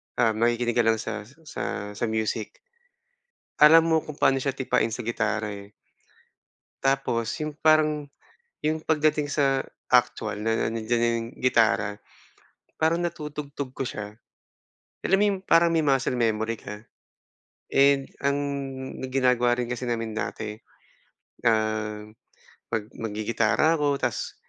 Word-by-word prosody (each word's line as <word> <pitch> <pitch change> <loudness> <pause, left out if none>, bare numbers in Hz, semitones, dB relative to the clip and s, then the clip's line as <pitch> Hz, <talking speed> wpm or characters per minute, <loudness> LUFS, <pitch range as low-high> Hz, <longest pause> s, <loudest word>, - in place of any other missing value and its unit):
ah, 115 -2 +3
makikinig 120 +2 +1
ka 115 - +3
lang 115 - +5
sa 105 -2 -5 0.2
sa 105 -8 -5
sa 105 +3 -2
music. 110 0 -3 1.0
Alam 160 +2 +9
mo 165 -1 +3
kung 150 -1 -9
paano 135 -3 +3
siya 135 0 -2
tipain 125 -3 +1
sa 115 +1 -5
gitara, 110 -2 -1
eh. 100 +1 -10 1.1
Tapos 130 -4 +1
'yong 155 -1 -4
parang 155 -2 +3 0.6
'yong 155 0 0
pagdating 150 -2 +1
sa 135 -2 +2 0.2
actual 110 -4 +1
na 115 +1 +1
nandiyan 115 +1 -1
na 120 0 +2
yung 115 0 -3
gitara, 115 -5 +2 0.8
parang 160 +2 +2
natutugtog 150 -5 -5
ko 135 - -4
siya. 105 -1 -6 0.9
Alam 195 - +3
mo 205 - +3
yung 200 -2 0
parang 170 -2 +4
may 165 - +3
muscle 135 -3 +1
memory 115 -2 0
ka. 105 +2 -9 0.9
And 140 0 +4 0.2
ang 140 0 +1 0.7
ginagawa 125 -2 +2
rin 125 -1 -2
kasi 125 0 -4
namin 115 -2 -2
dati, 110 0 -4 0.9
um, 110 -1 0 0.5
mag 110 - -1
maggigitara 115 +8 +1
ako 145 -1 +1
tapos 125 -3 -2
120 Hz, 130 wpm, -26 LUFS, 110-145 Hz, 1.1 s, Alam